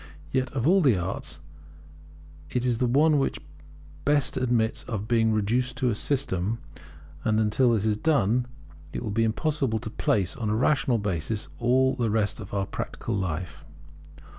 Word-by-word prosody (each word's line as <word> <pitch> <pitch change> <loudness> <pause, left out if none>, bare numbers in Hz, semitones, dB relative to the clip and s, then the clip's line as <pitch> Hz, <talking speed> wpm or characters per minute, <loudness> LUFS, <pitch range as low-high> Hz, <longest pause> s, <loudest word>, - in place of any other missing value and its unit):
Yet 130 0 0
of 130 -3 -1
all 190 +3 +5
the 130 - +4
arts, 90 -3 -4 1.1
it 125 0 -1
is 120 -2 +1
the 125 - +2
one 145 +4 +4
which 135 - -1 0.6
best 145 -1 +2
admits 120 0 +1
of 105 -2 -4
being 115 -1 +3
reduced 120 +4 0
to 125 -2 +1
a - - 0
system; 110 -5 -1 0.7
and 110 0 +2
until 115 +3 +3
this 110 -2 0
is 105 -1 +1
done 125 -4 +2 0.5
it - - -4
will 110 - -3
be 115 +2 +1
impossible 130 +1 0
to 110 0 -6
place 95 -4 0
on 115 -5 -2
a 105 - +1
rational 135 0 +2
basis 105 +1 -2
all 130 +2 +3
the 120 -3 0
rest 105 0 0
of 105 -1 -8
our 100 -1 -1
practical 115 - -5
life. 90 -4 -3
115 Hz, 165 wpm, -26 LUFS, 105-130 Hz, 1.1 s, all